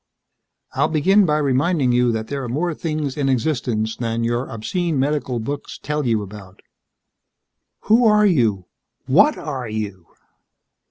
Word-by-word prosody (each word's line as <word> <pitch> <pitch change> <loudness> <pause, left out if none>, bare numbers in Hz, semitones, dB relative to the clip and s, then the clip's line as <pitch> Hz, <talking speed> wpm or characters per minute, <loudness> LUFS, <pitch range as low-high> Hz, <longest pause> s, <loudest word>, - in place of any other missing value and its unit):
"I'll - - +2
begin 190 +6 +3
by 150 0 +2
reminding 140 0 +1
you 120 0 +3
that 110 -1 -3
there 140 -1 -4
are 125 - -5
more 165 +7 -1
things 155 -4 -3
in 140 -2 0
existence 120 -5 -1
than 115 -1 -2
your 120 +2 -1
obscene 160 - -2
medical 135 -2 -1
books 140 +6 -5
tell 150 -2 -3
you 110 -3 +1
about." 95 -1 -12 1.2
"Who 225 +3 +4
are 210 0 +5
you? 115 - +2 0.4
What 190 - +4
are 130 -6 -5
you?" 105 -5 -5
135 Hz, 145 wpm, -21 LUFS, 115-155 Hz, 1.2 s, are